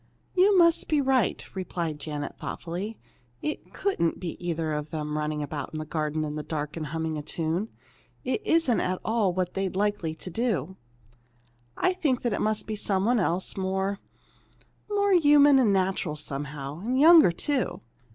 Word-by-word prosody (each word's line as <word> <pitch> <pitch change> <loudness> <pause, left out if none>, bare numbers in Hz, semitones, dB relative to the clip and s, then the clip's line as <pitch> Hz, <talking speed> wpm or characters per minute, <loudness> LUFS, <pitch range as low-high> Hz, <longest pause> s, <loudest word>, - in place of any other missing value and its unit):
"You 385 +2 +5
must 335 -1 +4
be 305 - +3
right," 265 -6 +1
replied 170 -5 -3
Janet, 145 -1 -5
thoughtfully. 185 +6 -5 0.5
"It 305 - -4
couldn't 380 - -1
be 175 -3 -4
either 165 -2 -1
of 150 0 -3
them 150 -1 -4
running 150 0 -2
about 145 0 -5
in - - -4
the 155 - -4
garden 155 0 -2
in 150 -1 -3
the 150 - -3
dark 150 -1 -4
and 155 -2 -4
humming 160 0 -3
a - - -4
tune. 165 +7 -2 0.5
It - - -1
isn't 325 - +3
at 185 0 -1
all 220 -4 +2
what 180 0 -2
they'd 190 -1 -1
be - - -5
likely 205 -6 0
to 170 - -8
do. 215 -3 -1 1.0
I 370 - +2
think 275 -9 0
it 225 -4 0
must 215 0 0
be 215 - -3
some 195 -2 0
one 240 +1 +3
else, 180 -1 0
more 190 +1 -1 0.9
more 405 -1 +2
human 290 -4 +6
and 230 -6 +4
natural, 185 -4 0
somehow. 145 0 -5
And 245 +7 -1
younger, 320 - +8
too. 260 - -1
190 Hz, 170 wpm, -27 LUFS, 155-245 Hz, 1.0 s, younger